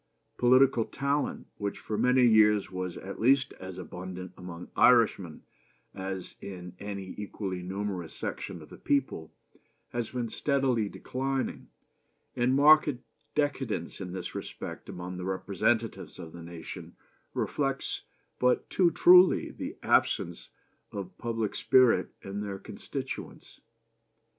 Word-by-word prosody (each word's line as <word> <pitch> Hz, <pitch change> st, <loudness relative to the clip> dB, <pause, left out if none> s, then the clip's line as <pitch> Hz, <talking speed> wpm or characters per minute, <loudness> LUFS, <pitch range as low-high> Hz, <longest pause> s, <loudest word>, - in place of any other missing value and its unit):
Political 125 Hz, -1 st, +5 dB
talent, 140 Hz, +1 st, -1 dB
which 100 Hz, -1 st, -3 dB
for 110 Hz, -, -4 dB
many 125 Hz, +2 st, +4 dB
years 105 Hz, -3 st, +5 dB
was 90 Hz, -1 st, -4 dB
at 100 Hz, -, -7 dB
least 130 Hz, +3 st, +4 dB
as 95 Hz, -1 st, -8 dB
abundant 90 Hz, 0 st, -7 dB
among 90 Hz, -1 st, -9 dB
Irishmen 110 Hz, -9 st, +4 dB, 0.5 s
as 95 Hz, -1 st, -5 dB
in 90 Hz, -2 st, -8 dB
any 100 Hz, -2 st, -6 dB
equally 100 Hz, -3 st, -4 dB
numerous 95 Hz, -2 st, -4 dB
section -, -, -5 dB
of -, -, -15 dB
the -, -, -12 dB
people, 130 Hz, -, 0 dB, 0.6 s
has 120 Hz, -2 st, -3 dB
been 120 Hz, -2 st, -3 dB
steadily 130 Hz, -7 st, +1 dB
declining, 135 Hz, +3 st, -3 dB, 0.7 s
and 125 Hz, +2 st, +2 dB
marked 150 Hz, +2 st, +7 dB, 0.5 s
decadence 140 Hz, -9 st, -1 dB
in 90 Hz, -2 st, -5 dB
this 90 Hz, -1 st, -5 dB
respect -, -, -7 dB
among 90 Hz, +1 st, -6 dB
the 90 Hz, -, -5 dB
representatives 100 Hz, +4 st, -1 dB
of 80 Hz, -, -8 dB
the 85 Hz, -, -9 dB
nation 85 Hz, 0 st, -9 dB, 0.4 s
reflects -, -, -1 dB, 0.4 s
but 125 Hz, 0 st, +2 dB
too 180 Hz, -3 st, +4 dB
truly 180 Hz, +2 st, +6 dB
the -, -, -6 dB
absence -, -, +1 dB, 0.4 s
of 95 Hz, -3 st, -6 dB
public 115 Hz, -3 st, -2 dB
spirit 130 Hz, -2 st, +4 dB
in 100 Hz, +1 st, -4 dB
their 100 Hz, -2 st, -4 dB
constituents. -, -, -7 dB
105 Hz, 125 wpm, -29 LUFS, 95-125 Hz, 0.7 s, marked